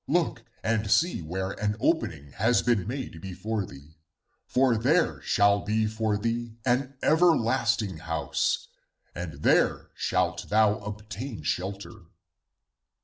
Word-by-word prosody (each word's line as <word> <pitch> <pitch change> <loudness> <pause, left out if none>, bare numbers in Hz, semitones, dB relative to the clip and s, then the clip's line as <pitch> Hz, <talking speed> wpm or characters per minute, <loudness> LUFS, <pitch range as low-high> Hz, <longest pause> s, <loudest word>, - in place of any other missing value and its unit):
Look - - +1 0.2
and 110 -2 0
see 170 - +3
where 95 +4 -3
an 105 0 +1
opening 80 - 0
has 115 - +2
been 115 -6 +1
made 125 - -5
before 100 +3 -3
thee, 75 +3 -14 0.5
for 130 -2 +3
there 150 +10 +2
shall 100 0 +3
be 110 +2 0
for 110 -1 0
thee 115 +1 -3
an 130 +2 0
ever 165 +2 +5
lasting 115 -6 0
house, 80 0 -1 0.5
and 80 -4 -7
there - - +2
shalt - - -1
thou 105 0 +3
obtain 105 +4 -7
shelter.' 95 +2 -4
110 Hz, 125 wpm, -27 LUFS, 95-120 Hz, 0.5 s, ever